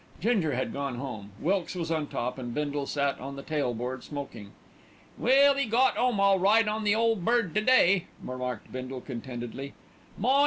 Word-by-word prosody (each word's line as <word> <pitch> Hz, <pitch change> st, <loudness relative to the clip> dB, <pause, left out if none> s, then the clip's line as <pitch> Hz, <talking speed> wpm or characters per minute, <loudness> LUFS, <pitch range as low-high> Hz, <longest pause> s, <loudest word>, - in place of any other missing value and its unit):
Ginger 195 Hz, -, +1 dB
had 130 Hz, -, -2 dB
gone 140 Hz, -2 st, -3 dB
home, 120 Hz, -6 st, -6 dB
Wilkes 185 Hz, +2 st, 0 dB
was 165 Hz, -2 st, -3 dB
on 155 Hz, -2 st, 0 dB
top, 125 Hz, +2 st, -3 dB
and 120 Hz, -2 st, -5 dB
Bindle 145 Hz, -1 st, -2 dB
sat 140 Hz, -1 st, 0 dB
on 140 Hz, +2 st, -6 dB
the 140 Hz, -, -8 dB
tail 150 Hz, -5 st, -1 dB
board 125 Hz, +2 st, -4 dB
smoking. 135 Hz, -8 st, -7 dB, 0.7 s
"Well, 275 Hz, +3 st, +5 dB
'e 280 Hz, -, +2 dB
got 245 Hz, +4 st, +3 dB
'ome 245 Hz, -4 st, +1 dB
all 195 Hz, -1 st, +4 dB
right 210 Hz, +4 st, +4 dB
on 215 Hz, +1 st, -1 dB
the 205 Hz, +1 st, +4 dB
Ole 225 Hz, 0 st, +3 dB
Bird 230 Hz, 0 st, +1 dB
to 215 Hz, -, +2 dB
day," 200 Hz, -7 st, +4 dB
remarked 125 Hz, -3 st, -5 dB
Bindle 130 Hz, 0 st, -5 dB
contentedly. 125 Hz, +1 st, -6 dB, 0.4 s
"My! 260 Hz, +7 st, +3 dB
150 Hz, 185 wpm, -28 LUFS, 130-215 Hz, 0.7 s, Well